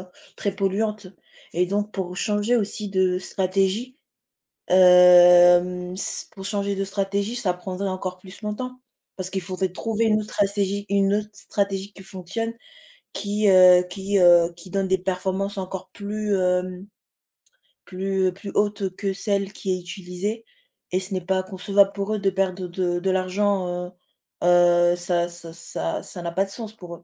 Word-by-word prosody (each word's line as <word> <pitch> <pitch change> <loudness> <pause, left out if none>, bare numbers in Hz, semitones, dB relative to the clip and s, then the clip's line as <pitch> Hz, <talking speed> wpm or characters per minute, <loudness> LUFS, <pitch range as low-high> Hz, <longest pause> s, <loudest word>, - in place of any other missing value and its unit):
heu 185 - -11 0.3
très 200 -2 -2
polluantes 200 +1 -1 0.4
et 180 +2 +1
donc 205 +3 -2
pour 180 -2 -4
changer 210 +4 +1
aussi 210 -1 -2
de 185 -1 +1
stratégie, 195 +7 -1 0.7
hem, 180 0 +6
s 190 - -4
pour 195 - -10
changer 200 -1 -1
de 195 - -1
stratégie, 200 +3 -2
ça 195 -7 0
prendrait 185 +2 -5
encore 185 -1 -4
plus 185 +2 -13
longtemps. 250 +4 -5 0.4
Parce 185 -1 -5
qu'il 190 0 -2
faudrait 185 +1 -2
trouver 225 +4 -1
une 215 -1 +3
autre 210 - -9
stratégie 200 0 -1
une 200 0 +2
autre 210 0 -2
stratégie 200 -1 -3
qui 190 - -13
fonctionne, 195 +5 -5 0.6
qui, 205 +1 0
heu, 185 -1 +7
qui, 195 +2 -1
heu, 175 -1 +6
qui 170 +2 -13
donne 195 0 -1
des 190 0 +2
performances 190 +2 -2
encore 190 0 -6
plus, 210 0 -3
hem, 180 0 -1 1.0
plus 190 0 -1
plus 195 +1 -8
hautes 205 -2 0
que 200 -1 -2
celle 195 0 -2
qui 195 -1 -4
est 185 - -2
utilisée 190 +5 -5 0.5
et 185 - +1
ce 190 +1 -7
n'est 185 - -1
pas 185 0 0
concevable 195 +1 +2
pour 200 +1 -3
eux 215 - -1
de 195 -1 +2
perdre 190 -1 -2
de 175 0 -1
de 190 +2 -1
l'argent, 190 +1 0 0.2
heu - - -14 0.5
heu, 175 0 +5
ça 175 -1 -1
ça 170 -1 -11
ça 80 - -5
ça 180 - -9
n'a 170 0 -4
pas 190 +3 +1
de - - -13
sens 220 +1 -7
pour 175 -5 -10
eux. 175 - -18
190 Hz, 170 wpm, -23 LUFS, 180-200 Hz, 1.0 s, heu